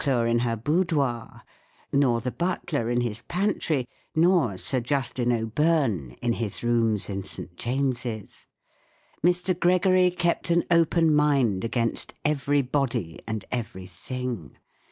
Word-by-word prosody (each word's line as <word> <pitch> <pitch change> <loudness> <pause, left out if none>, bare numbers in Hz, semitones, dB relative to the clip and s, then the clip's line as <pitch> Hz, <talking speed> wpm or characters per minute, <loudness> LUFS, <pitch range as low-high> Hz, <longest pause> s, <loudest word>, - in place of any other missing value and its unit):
Lady - - -5
Maclure 120 -4 +2
in 120 0 +2
her 120 -1 0
boudoir, 140 - -1 0.5
nor 125 -4 +3
the 125 - -3
butler 160 -7 -2
in 120 0 +1
his 120 -1 -2
pantry* 170 - -1 0.3
nor 160 - +3
Sir 130 +7 +1
Justin 125 -1 0
O'Byrne 115 - 0
in 120 -1 +2
his 115 -2 -4
rooms 115 -3 +2
in 100 -1 -4
St. 90 -2 -7
James's. 120 -2 -3 0.8
Mr, 180 +1 +2
Gregory 185 +1 +4
kept 175 -1 0
an 170 0 +3
open 165 -1 +4
mind 140 -10 +2
against 115 0 -1
everybody 140 - 0
and 110 -2 -4
everything. 110 - -5
125 Hz, 125 wpm, -26 LUFS, 115-155 Hz, 0.8 s, Gregory